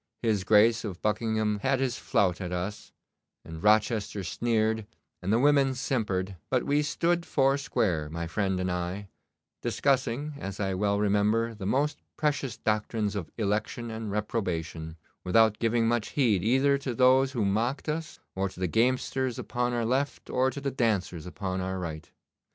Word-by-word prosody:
His 110 -5 +1
Grace 110 +3 +5
of 95 -5 -5
Buckingham 110 -1 0
had 135 +4 +1
his 130 -3 -1
flout 95 -1 +1
at 90 -1 -4
us, 90 +4 -4 0.5
and 80 0 -8
Rochester 105 -1 +2
sneered, 110 +1 0 0.3
and 95 +2 -1
the 110 - +4
women 135 0 +4
simpered; 100 -8 -1
but 130 -1 +1
we 145 +1 +2
stood 170 +3 0
four 135 -4 +2
square, 95 - -1
my 85 +2 -4
friend 95 +2 -1
and 90 0 -1
I, 90 +3 -3 0.5
discussing, 140 +1 0
as 100 -4 -6
I 95 -2 0
well 100 +2 +1
remember, 105 +3 +2
the 100 -3 -6
most 145 +7 +1 0.2
precious 145 -6 -1
doctrines 110 -1 -1
of 95 -6 -4
election 110 +2 -2
and 110 -1 -5
reprobation, 85 -6 -3 0.3
without 105 +3 +4
giving 115 0 +2
much 120 -2 +1
heed 115 -10 +2
either 135 +5 +3
to 130 -3 -4
those 130 +2 +4
who 115 -6 0
mocked 115 +10 0
us, 155 +1 -3
or 95 +1 -1
to 90 - -14
the 95 - 0
gamesters 125 +4 +1
upon 125 0 -1
our 120 -1 0
left, 135 +4 -1
or 130 +1 +2
to 130 - -6
the 140 0 -2
dancers 100 -10 -1
upon 95 0 -3
our 95 0 -3
right. 80 -4 -6
110 Hz, 165 wpm, -28 LUFS, 95-130 Hz, 0.5 s, Grace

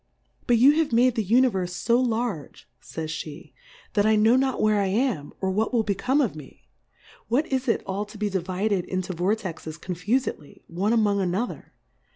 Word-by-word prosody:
But 240 - +4
you 260 +5 +7
have 320 -4 +1
made 245 +2 +4
the 225 -2 -1
Univerfe 195 -5 +1
fo 240 +2 +3
targe, 220 - -4 0.2
Jhj'spe^ 155 0 -7 0.4
that 205 - +3
I 215 +1 +4
know 220 +3 +4
not 265 0 +1
where 215 -1 +3
I 195 - 0
am, 200 - -1
or 190 -1 -1
what 215 +4 0
will 235 -3 +2
become 230 +8 +1
of 235 - -1
me; 150 -3 -13 0.6
what 255 +7 +1
is 260 0 -1
it 230 - +1
all 195 +2 -3
to 210 +1 -13
be 210 0 -1
divided 190 +1 -1
into 185 0 -3
Vortexes 180 -4 -3
confufedly, 185 - -3
one 190 +6 -1
among 210 -3 +2
another 190 +6 -3
210 Hz, 175 wpm, -25 LUFS, 185-235 Hz, 0.6 s, you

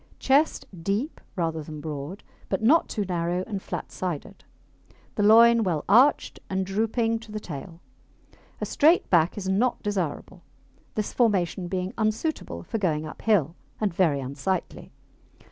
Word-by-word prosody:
Chest 280 +4 +2 0.2
deep 205 - -2
rather 165 -3 -1
than 155 0 -8
broad, 150 +4 -6 0.3
but 195 +2 -1
not 305 +9 +4
too 210 -3 -2
narrow 175 0 -1
and 200 -4 -4
flat - - -6
sided. 185 +2 -5 0.7
The - - -2
loin 230 +2 +7
well 165 -6 -1
arched 245 +9 +4
and 190 0 -1
drooping 225 +3 0
to 225 -1 -13
the 215 - -4
tail. 165 -1 -8 0.8
A - - -2
straight 320 +4 +3
back 170 0 +3
is 195 -2 -4
not 220 +6 +1
desirable, 185 -2 -3 0.5
this 215 -1 -2
formation 190 -6 +1
being 185 +1 -3
unsuitable 215 - -2
for 225 - -3
going 160 -5 0
uphill, 165 -1 0 0.2
and 210 -4 0
very 165 -6 +2
unsightly. 140 +8 -4
190 Hz, 145 wpm, -26 LUFS, 170-220 Hz, 0.8 s, loin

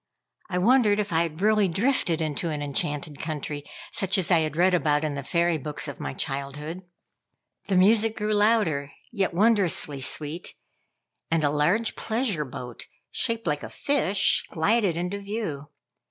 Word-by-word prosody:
I 180 - -2
wondered 215 +1 +4
if 205 -4 -2
I 165 - +3
had 170 +2 -3
really 215 -1 +4
drifted 185 - +1
into 155 +2 -2
an 150 -2 -3
enchanted 145 +1 -1
country, 150 -2 -4 0.3
such 195 +1 +1
as 185 -1 0
I 170 - +6
had 155 -1 -2
read 185 +2 +4
about 150 -3 +2
in 155 -2 -1
the 140 - -4
fairy 170 +3 +1
books 150 +1 -6
of - - -7
my 70 - -5
childhood. 145 +5 -4 0.9
The 195 - +1
music 220 +4 +4
grew 210 -1 -1
louder, 205 -10 +2 0.2
yet 200 -5 0
wondrously 180 -8 +2
sweet, 150 +5 -2 0.7
and 165 -1 +1
a 145 - +2
large 175 +10 +1
pleasure 220 - -1
boat, 125 -2 -9 0.2
shaped 230 -1 -1
like 150 -3 -1
a - - -7
fish, 235 -9 +2
glided 190 +1 +1
into 180 +4 -3
view. 200 -9 -5
175 Hz, 160 wpm, -25 LUFS, 150-210 Hz, 0.9 s, I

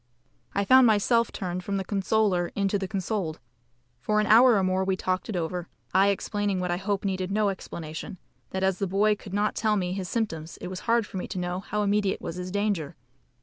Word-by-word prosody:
I 200 - +1
found 260 +3 +7
myself 230 +2 +3
turned 180 -1 -4
from 200 +2 -2
the 190 - -2
consoler 195 -2 +1
into 200 0 +1
the 190 - -3
consoled. 190 -4 -2 0.6
For 210 +12 +1
an 210 - +2
hour 235 +3 +7
or 195 - +2
more 185 0 +1
we 190 0 +1
talked 185 0 -2
it 215 - -3
over, 175 0 -3 0.3
I 190 +2 +5
explaining 200 0 0
what 180 -1 -1
I 175 - 0
hope 200 +1 -2
needed 190 -1 -1
no 205 +1 +2
explanation, 170 -2 -6 0.3
that 190 0 -3
as 190 -1 +1
the 195 - 0
poor 200 +3 +2
boy - - +3
could 200 -1 -8
not 210 +1 +1
tell 215 -1 +1
me 180 -2 -1
his 185 -2 -4
symptoms 165 -9 -3
it - - -7
was 185 0 -5
hard 230 -1 +3
for 195 - -8
me 180 - -4
to - - -6
know 180 0 -2
how 210 +2 -2
immediate 205 -1 +1
was 165 - -6
his 180 0 -5
danger. 200 -6 -1
195 Hz, 225 wpm, -27 LUFS, 180-210 Hz, 0.6 s, found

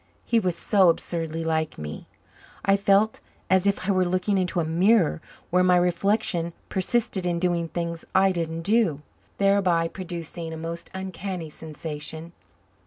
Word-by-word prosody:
He 235 - +3
was 180 -5 -1
so 190 0 +4
absurdly 165 -1 -2
like 160 -1 -1
me. 75 0 -7 0.6
I 195 - +5
felt 200 +2 +3 0.3
as 190 +1 +4
if 200 -1 0
I - - +3
were 185 -1 +3
looking 185 +3 0
into 180 -1 0
a 165 - +1
mirror 175 +1 +3 0.3
where 180 +1 +4
my 180 0 +5
reflection 180 -1 +1 0.2
persisted 190 0 0
in 175 -1 0
doing 170 -1 0
things 170 0 -4
I 190 0 +5
didn't 165 -2 -3
do, 195 -7 +2 0.3
thereby 195 -4 +3
producing 170 -2 -6
a - - -6
most 165 +1 -6
uncanny 185 -3 -5
sensation. 160 +1 -7
175 Hz, 150 wpm, -25 LUFS, 165-195 Hz, 0.6 s, I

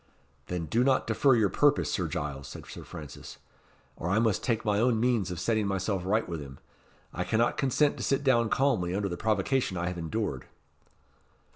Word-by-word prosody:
"Then 90 -2 -3
do 115 +9 +1
not 130 0 +2
defer 125 +4 +3
your 110 -4 +3
purpose, 145 0 +3
Sir 90 -4 -1
Giles," 70 -3 -4
said - - -9
Sir - - -9
Francis; 75 -2 -10 0.6
"or 85 - -4
I 100 - +2
must 110 -3 +1
take 115 -3 0
my 105 -1 +2
own 115 -1 +2
means 115 -5 +1
of 90 -2 -5
setting 110 +2 +1
myself 95 0 -1
right 105 +4 +1
with 85 -3 -4
him. 65 -2 -10 0.6
I - - -2
cannot 115 +2 +1
consent 145 +1 +2
to - - -5
sit 135 0 +1
down 120 -4 +3
calmly 110 -11 +1
under 100 0 -1
the 90 - -3
provocation 110 +1 0
I 85 +1 -1
have 90 -1 -5
endured." 80 -5 -3
105 Hz, 190 wpm, -29 LUFS, 90-120 Hz, 0.6 s, defer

